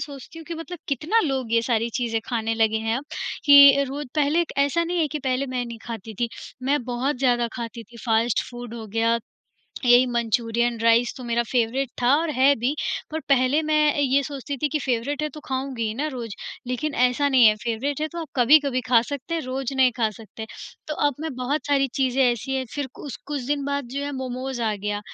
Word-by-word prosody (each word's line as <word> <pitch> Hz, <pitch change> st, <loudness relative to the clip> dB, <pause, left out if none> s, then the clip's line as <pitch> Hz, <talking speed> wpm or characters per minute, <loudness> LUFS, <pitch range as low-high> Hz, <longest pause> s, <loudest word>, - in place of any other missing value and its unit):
सोचती 285 Hz, +2 st, -8 dB
हूँ 325 Hz, -, -10 dB
कि 340 Hz, -, -5 dB
मतलब 330 Hz, +2 st, -7 dB
कितना 315 Hz, -, +1 dB
लोग 265 Hz, -5 st, -2 dB
ये 230 Hz, 0 st, +4 dB
सारी 230 Hz, -1 st, 0 dB
चीज़ें 225 Hz, -2 st, -1 dB
खाने 225 Hz, -2 st, -1 dB
लगे 220 Hz, -1 st, +2 dB
हैं 225 Hz, -, +2 dB
अब 275 Hz, -, -9 dB, 0.4 s
कि 280 Hz, -1 st, +8 dB
रोज़ 285 Hz, +1 st, -5 dB
पहले 305 Hz, +3 st, +2 dB
ऐसे 285 Hz, +4 st, +2 dB
नहीं 350 Hz, +1 st, -2 dB
है 315 Hz, -2 st, +2 dB
कि 300 Hz, +1 st, -4 dB
पहले 260 Hz, 0 st, -1 dB
मैं 255 Hz, -1 st, -2 dB
नहीं 235 Hz, -1 st, -8 dB
खाती 225 Hz, -2 st, -7 dB
थी। 240 Hz, -, +1 dB, 0.3 s
मैं 280 Hz, +1 st, +1 dB
बहुत 250 Hz, +4 st, -1 dB
ज़्यादा 245 Hz, -3 st, +2 dB
खाती 235 Hz, -1 st, -6 dB
थी 235 Hz, +3 st, -16 dB
फास्ट 225 Hz, +1 st, +2 dB
फूड 240 Hz, -1 st, -8 dB
हो 225 Hz, -2 st, -7 dB
गया, 230 Hz, +2 st, +1 dB, 0.7 s
यही 245 Hz, +1 st, +6 dB
मंचूरियन 235 Hz, 0 st, 0 dB
राइस 230 Hz, +1 st, +4 dB
तो 255 Hz, -, -8 dB
मेरा 235 Hz, 0 st, +1 dB
फेवरेट 250 Hz, +2 st, 0 dB
था 245 Hz, +3 st, +5 dB
और 325 Hz, 0 st, 0 dB
है 270 Hz, +2 st, +5 dB
भी। 250 Hz, +6 st, 0 dB, 0.4 s
पर 315 Hz, +1 st, -3 dB
पहले 270 Hz, +2 st, +3 dB
मैं 310 Hz, 0 st, +1 dB, 0.2 s
ये 280 Hz, 0 st, +3 dB
सोचती 280 Hz, 0 st, -5 dB
थी 295 Hz, -, 0 dB
कि 305 Hz, -, -1 dB
फेवरेट 265 Hz, +4 st, -1 dB
है 305 Hz, -, 0 dB
तो 305 Hz, -, -11 dB
खाऊँगी 260 Hz, -2 st, -3 dB
ही 215 Hz, -, -3 dB
ना 290 Hz, +6 st, -2 dB
रोज़। 235 Hz, -7 st, -6 dB, 0.3 s
लेकिन 265 Hz, +4 st, -2 dB
ऐसा 250 Hz, +3 st, +2 dB
नहीं 260 Hz, -3 st, +5 dB
है 215 Hz, -, +6 dB
फेवरेट 260 Hz, +5 st, -2 dB
है 310 Hz, -, 0 dB
तो 340 Hz, -, -4 dB
आप 320 Hz, -, -6 dB
कभी-कभी 265 Hz, +1 st, +4 dB
खा 235 Hz, -2 st, +6 dB
सकते 285 Hz, +5 st, -5 dB
हैं, 330 Hz, -, 0 dB
रोज़ 260 Hz, +1 st, -3 dB
नहीं 260 Hz, -1 st, +4 dB
खा 230 Hz, -3 st, +2 dB
सकते। 220 Hz, +1 st, -10 dB, 0.4 s
तो 305 Hz, -, -2 dB
अब 290 Hz, -, 0 dB
मैं 315 Hz, -3 st, -4 dB
बहुत 260 Hz, +4 st, -2 dB
सारी 275 Hz, -2 st, +2 dB
चीज़ें 265 Hz, 0 st, +2 dB
ऐसी 245 Hz, +2 st, 0 dB
हैं 265 Hz, -1 st, -1 dB
फ़िर 285 Hz, -2 st, -2 dB
कुस 285 Hz, -, -7 dB
कुछ 285 Hz, -2 st, -3 dB
दिन 285 Hz, 0 st, -1 dB
बाद 280 Hz, 0 st, -2 dB
जो 280 Hz, -, -2 dB
है 285 Hz, -, -4 dB
मोमोस 260 Hz, -1 st, -4 dB
आ 220 Hz, -2 st, 0 dB
गया, 205 Hz, +1 st, -3 dB
255 Hz, 220 wpm, -24 LUFS, 235-285 Hz, 0.7 s, कि